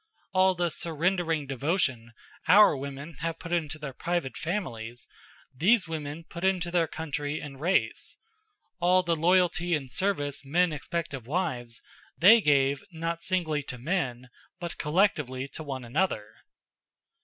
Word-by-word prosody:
All 185 Hz, 0 st, +4 dB
the 175 Hz, -1 st, 0 dB
surrendering 165 Hz, -1 st, 0 dB
devotion 135 Hz, -4 st, -1 dB, 0.3 s
our 205 Hz, -4 st, +7 dB
women 140 Hz, +3 st, -7 dB
have 165 Hz, +1 st, -2 dB
put 165 Hz, -, -9 dB
into 160 Hz, -3 st, -1 dB
their 150 Hz, -3 st, -6 dB
private 170 Hz, -2 st, -2 dB
families, 120 Hz, -, -4 dB, 0.5 s
these 185 Hz, -, +3 dB
women 155 Hz, 0 st, -5 dB
put 170 Hz, +1 st, -9 dB
into 185 Hz, -2 st, +1 dB
their 170 Hz, -2 st, +2 dB
country 150 Hz, -1 st, -3 dB
and 135 Hz, -2 st, -9 dB
race. 185 Hz, +4 st, 0 dB, 0.6 s
All 180 Hz, +1 st, +4 dB
the 170 Hz, -1 st, +1 dB
loyalty 175 Hz, +1 st, +3 dB
and 135 Hz, -4 st, -5 dB
service 145 Hz, -8 st, -1 dB
men 165 Hz, +4 st, +2 dB
expect 165 Hz, +2 st, -3 dB
of 125 Hz, -4 st, -7 dB
wives, 125 Hz, -8 st, -2 dB, 0.3 s
they 220 Hz, +6 st, +8 dB
gave, 140 Hz, -3 st, +3 dB
not 165 Hz, 0 st, -3 dB
singly 170 Hz, -5 st, 0 dB
to 130 Hz, -2 st, -6 dB
men, 125 Hz, -4 st, -2 dB, 0.3 s
but 170 Hz, -2 st, -6 dB
collectively 150 Hz, -6 st, +1 dB
to -, -, -7 dB
one 135 Hz, -4 st, -5 dB
another. 120 Hz, -, 0 dB
160 Hz, 140 wpm, -28 LUFS, 140-175 Hz, 0.6 s, they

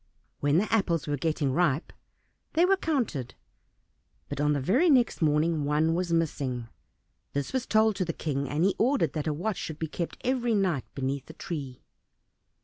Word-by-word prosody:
When 145 Hz, +2 st, +2 dB
the 205 Hz, +5 st, +1 dB
apples 180 Hz, -7 st, +1 dB
were 145 Hz, -, -1 dB
getting 150 Hz, -2 st, 0 dB
ripe 160 Hz, -1 st, +1 dB, 0.6 s
they 335 Hz, +2 st, +4 dB
were 390 Hz, +1 st, +4 dB
counted, 245 Hz, -, -2 dB, 0.9 s
but -, -, -3 dB
on 150 Hz, 0 st, +3 dB
the 145 Hz, -, 0 dB
very 245 Hz, -, +3 dB
next 250 Hz, -, +3 dB
morning 155 Hz, 0 st, +2 dB
one 150 Hz, +3 st, +2 dB
was 175 Hz, 0 st, -1 dB
missing. 135 Hz, -8 st, -1 dB, 0.6 s
This 140 Hz, -, -2 dB
was 260 Hz, -1 st, -1 dB
told 215 Hz, -1 st, +3 dB
to 185 Hz, -, 0 dB
the 165 Hz, -, -1 dB
King, 140 Hz, -4 st, -3 dB
and 150 Hz, +3 st, 0 dB
he 195 Hz, +1 st, +3 dB
ordered 240 Hz, -, +2 dB
that 155 Hz, -1 st, -3 dB
a -, -, +2 dB
watch 180 Hz, +7 st, -2 dB
should 160 Hz, -, -5 dB
be 160 Hz, -, -2 dB
kept 165 Hz, +2 st, -4 dB
every 245 Hz, -3 st, +1 dB
night 185 Hz, -10 st, +1 dB
beneath 135 Hz, 0 st, -2 dB
the 160 Hz, -, -10 dB
tree. 140 Hz, -6 st, -6 dB
165 Hz, 180 wpm, -28 LUFS, 145-215 Hz, 0.9 s, they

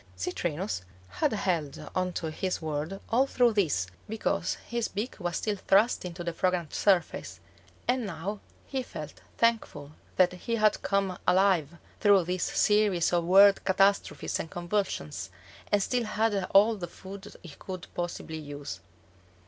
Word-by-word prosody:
Citrinus 180 Hz, -, -2 dB, 0.3 s
had 305 Hz, -3 st, 0 dB
held 165 Hz, -8 st, -2 dB
on 185 Hz, 0 st, 0 dB
to 160 Hz, -2 st, -3 dB
his 185 Hz, +3 st, -2 dB
world 155 Hz, +4 st, -3 dB
all 260 Hz, +4 st, +4 dB
through 245 Hz, -3 st, +3 dB
this, 160 Hz, -, +1 dB, 0.2 s
because 220 Hz, 0 st, -1 dB
his 235 Hz, -1 st, -1 dB
beak 210 Hz, +6 st, -4 dB
was 175 Hz, -2 st, -2 dB
still 210 Hz, -1 st, -1 dB
thrust 200 Hz, +3 st, +3 dB
into 175 Hz, 0 st, -6 dB
the 170 Hz, -1 st, -3 dB
fragrant 180 Hz, -3 st, 0 dB
surface, 185 Hz, -5 st, +1 dB, 0.5 s
and 250 Hz, -3 st, +1 dB
now 190 Hz, +4 st, -4 dB, 0.3 s
he 265 Hz, -1 st, -2 dB
felt 155 Hz, -, -8 dB, 0.2 s
thankful 220 Hz, -11 st, 0 dB, 0.2 s
that 180 Hz, -1 st, +4 dB
he 230 Hz, +6 st, -3 dB
had 215 Hz, -2 st, +3 dB
come 195 Hz, -2 st, 0 dB
alive 180 Hz, -4 st, +3 dB, 0.2 s
through 200 Hz, -3 st, +5 dB
these 180 Hz, +1 st, -2 dB
series 210 Hz, -5 st, +3 dB
of 170 Hz, -1 st, +2 dB
world 195 Hz, +3 st, +7 dB
catastrophes 195 Hz, +1 st, +1 dB
and 165 Hz, -, -4 dB
convulsions 175 Hz, -, -2 dB, 0.4 s
and 205 Hz, -1 st, +3 dB
still 245 Hz, +1 st, 0 dB
had 215 Hz, -2 st, 0 dB
all 210 Hz, +3 st, +5 dB
the 180 Hz, -4 st, -5 dB
food 195 Hz, +3 st, -10 dB
he 175 Hz, -, -9 dB
could 180 Hz, +4 st, -8 dB
possibly 170 Hz, -2 st, -4 dB
use. 145 Hz, -1 st, -7 dB
190 Hz, 150 wpm, -28 LUFS, 170-210 Hz, 0.5 s, world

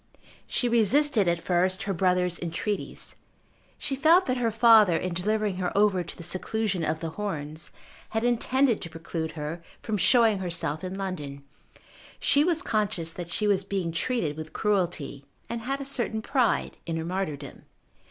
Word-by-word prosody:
She 245 Hz, -, 0 dB
resisted 235 Hz, 0 st, +3 dB
at 170 Hz, 0 st, +2 dB
first 185 Hz, +3 st, +1 dB
her 200 Hz, -, -1 dB
brother's 180 Hz, -1 st, +1 dB
entreaties. 175 Hz, +5 st, -4 dB, 0.6 s
She 275 Hz, -, -2 dB
felt 325 Hz, +7 st, +5 dB
that 255 Hz, 0 st, 0 dB
her 240 Hz, -2 st, +1 dB
father 220 Hz, -5 st, +6 dB
in 185 Hz, +1 st, -2 dB
delivering 210 Hz, +2 st, 0 dB
her 180 Hz, -1 st, -1 dB
over 200 Hz, -3 st, +3 dB
to -, -, -9 dB
the 170 Hz, -, -8 dB
seclusion 190 Hz, +1 st, -1 dB
of 160 Hz, 0 st, -1 dB
The 165 Hz, -1 st, -3 dB
Horns 155 Hz, -5 st, -4 dB, 0.4 s
had 220 Hz, 0 st, -1 dB
intended 245 Hz, 0 st, +2 dB
to 170 Hz, -, -5 dB
preclude 165 Hz, 0 st, -5 dB
her 155 Hz, +2 st, -5 dB, 0.2 s
from 215 Hz, -2 st, -1 dB
showing 225 Hz, 0 st, +4 dB
herself 170 Hz, -3 st, -2 dB
in 185 Hz, +1 st, -4 dB
London. 150 Hz, -8 st, -5 dB, 0.8 s
She 285 Hz, +1 st, +4 dB
was 340 Hz, +1 st, +1 dB
conscious 205 Hz, -7 st, -1 dB
that 175 Hz, -1 st, -6 dB
she 210 Hz, +5 st, -1 dB
was 200 Hz, -2 st, +2 dB
being 190 Hz, -3 st, -2 dB
treated 170 Hz, -4 st, -1 dB
with 155 Hz, 0 st, -7 dB
cruelty, 175 Hz, -9 st, -1 dB, 0.2 s
and 235 Hz, -1 st, -4 dB
had 270 Hz, +4 st, -2 dB
a 275 Hz, -, -5 dB
certain 235 Hz, -5 st, -2 dB
pride 255 Hz, -3 st, +1 dB
in 165 Hz, -1 st, -2 dB
her 160 Hz, -, -3 dB
martyrdom. 155 Hz, -7 st, -4 dB
190 Hz, 165 wpm, -27 LUFS, 170-225 Hz, 0.8 s, father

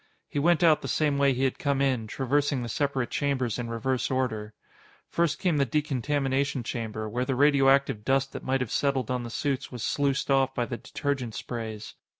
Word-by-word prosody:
He -, -, -2 dB
went 170 Hz, +3 st, +3 dB
out 160 Hz, -3 st, +5 dB
the -, -, -5 dB
same 145 Hz, -2 st, +1 dB
way 140 Hz, -1 st, +4 dB
he 130 Hz, +1 st, -1 dB
had 130 Hz, -, 0 dB
come 140 Hz, -1 st, 0 dB
in, 130 Hz, -5 st, +1 dB
traversing 135 Hz, +2 st, 0 dB
the 120 Hz, -, -5 dB
separate 135 Hz, 0 st, -1 dB
chambers 130 Hz, -5 st, -1 dB
in 120 Hz, -1 st, -3 dB
reverse 120 Hz, +2 st, -1 dB
order. 110 Hz, -5 st, -2 dB, 0.5 s
First 170 Hz, -3 st, 0 dB
came 175 Hz, -5 st, +1 dB
the 140 Hz, -, +4 dB
decontamination 140 Hz, -1 st, 0 dB
chamber, 110 Hz, -2 st, -4 dB
where 120 Hz, +4 st, -1 dB
the 130 Hz, 0 st, -1 dB
radioactive 135 Hz, -4 st, +4 dB
dust 135 Hz, +3 st, +1 dB
that -, -, -6 dB
might 130 Hz, 0 st, 0 dB
have 125 Hz, -, -3 dB
settled 135 Hz, -4 st, 0 dB
on 125 Hz, -1 st, -1 dB
the 120 Hz, -, -6 dB
suits 135 Hz, +3 st, -2 dB
was 120 Hz, -3 st, -6 dB
sluiced 140 Hz, +2 st, 0 dB
off 135 Hz, -1 st, +2 dB
by 120 Hz, -, 0 dB
the 120 Hz, -, -5 dB
detergent 135 Hz, -6 st, -3 dB
sprays. 110 Hz, -3 st, -6 dB
135 Hz, 195 wpm, -27 LUFS, 120-140 Hz, 0.5 s, out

